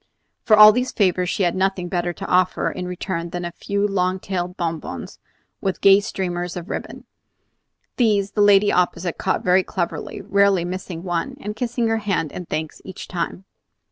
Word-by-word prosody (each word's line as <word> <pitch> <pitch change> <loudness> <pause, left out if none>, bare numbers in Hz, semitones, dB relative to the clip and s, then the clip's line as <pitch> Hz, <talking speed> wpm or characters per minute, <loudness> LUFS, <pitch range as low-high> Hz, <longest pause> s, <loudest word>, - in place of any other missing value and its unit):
For 215 - +6
all 215 0 +11
these 250 +3 -1
favors 180 -3 +1
she 195 - 0
had 175 - +1
nothing 190 -1 0
better 175 -1 -1
to - - -8
offer, 185 0 +1
in 180 - -5
return, 180 -1 -4
than 175 0 -4
a 175 - -4
few 200 +3 -1
long 185 -1 0
tailed 180 -1 -4
bonbons 165 -3 -5 0.4
with 195 -2 -2
gay 195 0 +7
streamers 180 -4 -3
of 175 +3 -7
ribbon. - - -6 0.9
These 205 -5 +2
the 210 - 0
lady 205 0 +5
opposite 175 -1 0
caught 190 - -1
very 180 +1 +4
cleverly, 180 -2 -4
rarely 200 -3 +2
missing 180 -1 -6
one, 175 -2 -3
and 210 +1 -5
kissing 240 0 -1
her 225 0 +1
hand 195 -8 -1
in 180 - -7
thanks 155 0 -4
each 190 - -9
time. 180 +1 -4
185 Hz, 175 wpm, -22 LUFS, 175-200 Hz, 0.9 s, all